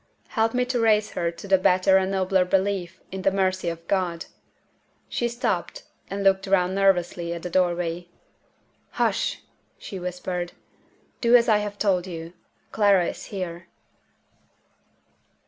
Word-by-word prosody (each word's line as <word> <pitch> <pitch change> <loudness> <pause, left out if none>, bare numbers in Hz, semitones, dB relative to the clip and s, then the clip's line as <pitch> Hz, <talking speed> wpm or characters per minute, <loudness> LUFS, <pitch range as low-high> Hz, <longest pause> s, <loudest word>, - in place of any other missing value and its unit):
Help 225 +1 0
me 250 0 +2
to 250 -1 -1
raise 215 -2 +3
her 170 -1 -1
to 170 +4 -10
the 190 -1 +4
better 185 +1 +4
and 190 0 +1
nobler 190 -1 +2
belief 185 -1 -1
in 190 0 -5
the 195 - +3
mercy 190 -2 0
of 165 0 -8
God!" 180 -4 -1 0.8
She 240 - -1
stopped, 240 - -2 0.3
and 200 0 -3
looked 195 0 +3
round 185 -1 +2
nervously 175 -3 +1
at 170 - -8
the 180 - -5
doorway. 175 -1 0 0.9
"Hush!" - - 0 0.3
she 195 - -7
whispered. 180 0 -4 0.7
"Do 235 0 +5
as 235 -1 +5
I 215 -2 +4
have 205 0 -5
told 190 -4 +1
you. 165 -1 -7 0.4
Clara 200 -5 +3
is - - -8
here." 175 -3 -6
190 Hz, 145 wpm, -24 LUFS, 175-200 Hz, 0.9 s, Do